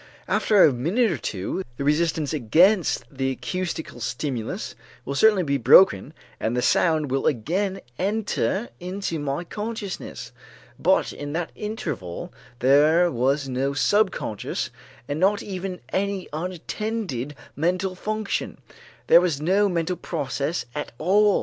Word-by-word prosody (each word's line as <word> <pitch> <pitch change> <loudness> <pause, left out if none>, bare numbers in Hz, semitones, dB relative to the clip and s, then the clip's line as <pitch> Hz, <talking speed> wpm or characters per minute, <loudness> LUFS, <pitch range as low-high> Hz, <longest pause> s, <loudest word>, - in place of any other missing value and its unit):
After 205 -3 +4
a 145 - +6
minute 180 - +1
or 165 - -1
two, 100 - -3 0.2
the - - -3
resistance 155 0 +1
against 165 - +3
the 135 0 0
acoustical 165 0 -4
stimulus 125 -1 -3 0.3
will 140 - -3
certainly 200 +5 +4
be 140 -3 0
broken 160 +3 +6 0.2
and 115 +3 -1
the 125 - +1
sound 155 -5 +2
will 135 0 +1
again 185 - -1 0.2
enter 205 +2 -1
into 180 -2 -3
my 145 +3 -2
consciousness, 210 +1 -6 0.5
but - - +2
in 145 0 -6
that 170 0 -2
interval 100 - -5 0.3
there 155 +7 +5
was 135 +3 +1
no 135 +2 -1
subconscious 190 - 0 0.4
and 145 +1 -3
not 200 +3 +2
even 185 -1 -5
any 195 +3 -1
unattended 180 - -4 0.2
mental 185 +4 0
function; 215 +2 -3 0.5
there 170 - +7
was 170 -6 0
no 195 +6 +3
mental 175 0 -1
process 150 0 -3
at 150 - -4
all. 200 +5 +4
170 Hz, 130 wpm, -24 LUFS, 140-195 Hz, 0.5 s, there